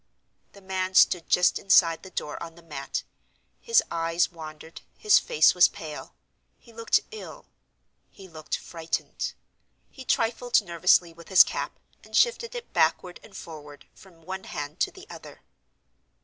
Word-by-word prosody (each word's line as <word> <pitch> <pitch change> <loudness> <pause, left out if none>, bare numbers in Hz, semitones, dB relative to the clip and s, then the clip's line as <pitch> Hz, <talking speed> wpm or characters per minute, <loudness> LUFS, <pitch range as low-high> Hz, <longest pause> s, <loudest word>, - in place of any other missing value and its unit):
The 200 - -16
man 190 0 -3
stood 175 -2 +4
just 180 0 +3
inside 170 -4 +4
the 190 - -12
door, 150 -4 -5
on 165 -1 -8
the 170 - -17
mat. 140 -4 -5 0.6
His 465 -1 +3
eyes 165 +1 0
wandered, 160 -1 -11 0.2
his 425 -2 +5
face 480 -2 +3
was - - +6
pale—he 235 - -13
looked 230 0 +1
ill; 435 - -10 0.6
he 195 - -14
looked 155 -3 -5
frightened. 165 -1 -5 0.6
He 265 - -11
trifled 240 0 +1
nervously 170 0 +2
with 170 0 -15
his 190 - +8
cap, - - -5 0.3
and - - -3
shifted 475 0 +1
it 485 - -8
backward 180 -1 +1
and 195 -3 -14
forward, 150 -3 -11
from 170 -4 -19
one 190 +2 -7
hand 145 +4 -7
to - - +1
the 380 0 -14
other. - - -12
180 Hz, 150 wpm, -26 LUFS, 165-225 Hz, 0.6 s, his